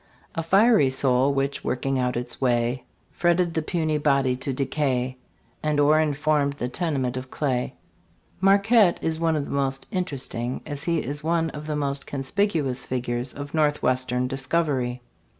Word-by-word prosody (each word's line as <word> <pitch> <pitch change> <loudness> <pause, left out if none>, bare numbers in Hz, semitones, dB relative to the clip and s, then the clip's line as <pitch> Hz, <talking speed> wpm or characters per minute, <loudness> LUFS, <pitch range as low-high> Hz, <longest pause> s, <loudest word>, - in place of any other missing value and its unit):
A 165 - -2
fiery 195 - +4
soul, 130 0 +3
which, 140 0 -1
working 130 +1 -1
out 125 -1 0
its 125 +2 -4
way, 120 0 +1 0.3
Fretted 175 0 +1
the 160 - 0
puny 155 -2 -1
body 140 -3 +2
to 135 +1 -2
decay, 130 -1 -1 0.4
And 150 -1 0
o'er 150 +2 +5
informed 150 -1 +1
the 125 -3 -4
tenement 135 -5 -1
of 130 0 -6
clay. 130 -4 -2 0.7
j\A 195 - +6
ARQUETTE 200 -1 +4
is 160 0 -1
one 165 -1 +1
of 145 -2 -1
the - - -8
most 135 -1 -1
interesting, 135 - -3
as 145 -2 -5
he 170 -1 +1
is 145 +3 -5
one 165 0 +1
of 150 0 -8
the 150 - -2
most 140 -1 -2
/ - - -32
I - - -10
conspicuous, 140 -2 -1
figures 125 0 -2
of 145 0 -8
Northwestern 130 -5 +1
discovery. 130 -2 -1
140 Hz, 170 wpm, -24 LUFS, 130-160 Hz, 0.7 s, j\A